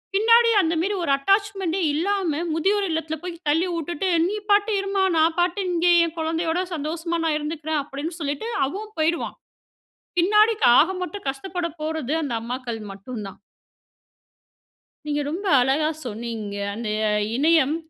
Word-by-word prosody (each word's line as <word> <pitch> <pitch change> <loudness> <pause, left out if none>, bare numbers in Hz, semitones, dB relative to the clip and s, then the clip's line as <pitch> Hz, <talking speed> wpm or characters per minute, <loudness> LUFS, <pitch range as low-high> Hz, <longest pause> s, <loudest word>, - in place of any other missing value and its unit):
பின்னாடி 460 +3 +5
அந்த 330 -2 0
மாரி 400 +4 0
ஒரு 285 - 0
அட்டாச்மென்ட்டே 390 +2 0
இல்லாம, 340 -1 0
முதியோர் 395 +5 +1
இல்லத்ல 320 0 -2
போயி 360 -1 -5
தள்ளி 325 +5 +2
உட்டுட்டு, 345 +3 -2 0.2
"நீ 405 - -2 0.2
பாட்டு 410 +2 +4
இரும்மா, 390 0 0
நான் 320 +1 +3
பாட்டு 355 +3 +1
இங்கே 350 0 +3
என் 335 0 -7
குழந்தையோட 325 +2 0
சந்தோஷமா 330 +3 -3
நான் 310 -2 +1
இருந்துக்குறேன்." 305 0 -2
அப்படின்னு 290 +4 -5
சொல்லிட்டு 290 +8 -3 0.2
அவன் 425 +8 -7
போய்டுவான். 325 +2 0 0.8
பின்னாடிக் 425 +4 +4
ஆக 325 - +5
மொத்தம் 395 -3 -7
கஷ்டப்பட 340 +5 -4
போறது 310 -2 -2
அந்த 260 -5 -2
அம்மாக்கள் 240 -1 -5
மட்டும் 215 +4 -8
தான். - - -15 1.7
நீங்க 295 0 -1
ரொம்ப 370 +6 -4 0.2
அழகா 275 +5 +2 0.2
சொன்னீங்க. 220 -2 -5 0.2
அந்த 225 0 -4 0.5
இணையம், 310 +1 +3
325 Hz, 135 wpm, -23 LUFS, 290-380 Hz, 1.7 s, பின்னாடி